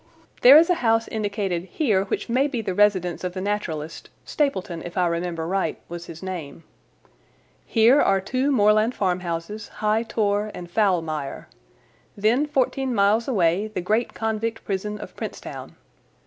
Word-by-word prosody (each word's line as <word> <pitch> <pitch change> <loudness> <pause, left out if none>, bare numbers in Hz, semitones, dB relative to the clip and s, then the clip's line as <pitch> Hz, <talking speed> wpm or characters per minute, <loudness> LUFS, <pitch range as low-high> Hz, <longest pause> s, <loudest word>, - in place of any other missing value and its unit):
There 265 +4 +10
is 330 +3 +5
a 345 - 0
house 225 -1 +2
indicated 200 -5 -2
here 195 - 0
which - - -3
may 255 +4 +2
be 260 -5 -3
the 190 -3 -2
residence 185 -4 +2
of 180 -1 -3
the 185 - -5
naturalist—Stapleton, 185 - -3
if 175 +2 -8
I 180 - +3
remember 170 -1 -2
right, 190 +3 -1
was 170 0 -7
his 165 +2 -10
name. 165 -5 -6 1.0
Here 235 +5 +5
are 195 0 +3
two 255 +8 -1
moorland 215 0 +3
farmhouses, 180 +2 -2
High 215 +1 0
Tor 215 -2 0
and 175 - -7
Foulmire. 165 -9 -1 0.7
Then 230 +8 +2
fourteen 265 -2 0
miles 205 +3 +3
away 195 -4 +1
the 215 -3 -5
great 215 +6 0
convict 220 0 -3
prison 210 +2 -3
of 210 - -10
Princetown. - - -7
205 Hz, 150 wpm, -23 LUFS, 180-225 Hz, 1.0 s, There